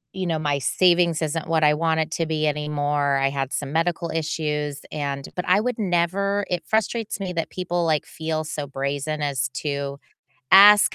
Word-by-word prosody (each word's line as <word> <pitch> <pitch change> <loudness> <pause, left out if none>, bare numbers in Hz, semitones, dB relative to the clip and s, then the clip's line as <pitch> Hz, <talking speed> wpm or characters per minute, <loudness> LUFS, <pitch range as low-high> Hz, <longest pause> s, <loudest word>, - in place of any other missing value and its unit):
you 185 -1 -2
know, 165 -2 0
my 145 -2 0
savings 170 +1 +2
isn't 155 +1 -2
what 160 -1 +1
I 150 0 +5
want 160 +1 0
it 160 0 -1
to 165 -1 -1
be 155 -1 -1
anymore, 145 -1 0
I 135 0 +2
had 135 -1 -3
some 140 -1 -3
medical 170 +1 0
issues 150 -2 -2
and 140 -2 -4
but 180 - -2
I 185 +3 +5
would 245 -1 -2
never 200 +2 0
it 175 -2 -2
frustrates 220 0 -1
me 185 -2 -4
that 165 -1 -2
people, 175 -1 -2
like, 155 -2 +1
feel 160 -1 -3
so 150 -2 -5
brazen 140 +3 -3
as 130 -2 -1
to 140 -2 -3 0.6
ask 205 +1 +8
160 Hz, 185 wpm, -23 LUFS, 145-175 Hz, 0.6 s, ask